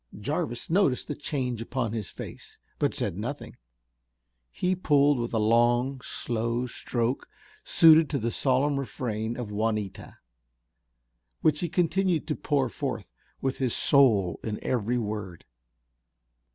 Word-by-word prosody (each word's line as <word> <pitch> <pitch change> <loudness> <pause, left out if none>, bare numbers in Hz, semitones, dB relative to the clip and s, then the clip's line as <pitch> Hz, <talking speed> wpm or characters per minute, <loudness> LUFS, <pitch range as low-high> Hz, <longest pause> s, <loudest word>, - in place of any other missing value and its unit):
Jarvis 120 +1 -3
noticed 165 -7 +2
the 150 - -2
change 130 -5 -3
upon 120 -1 -2
his 110 -4 -4
face, - - -10 0.2
but - - +1
said - - -2
nothing. - - -5 0.9
He 180 - 0
pulled 145 -5 +3
with 120 0 -2
a 115 - 0
long, 120 +4 +2
slow 115 +1 -2
stroke, 120 0 -2 0.3
suited 160 -1 +6
to 145 - 0
the 115 -2 -1
solemn 140 +3 +1
refrain 115 -4 -3
of 120 -4 -5
Juanita, 105 -2 -3 1.3
which 150 -1 +3
he 175 - -2
continued 175 +1 +1
to 150 - 0
pour 140 -3 0
forth 85 - -5 0.3
with 135 0 -2
his 130 -3 0
soul 105 - +4
in 105 -2 -3
every 120 0 0
word. 105 -6 -5
125 Hz, 130 wpm, -27 LUFS, 115-145 Hz, 1.3 s, suited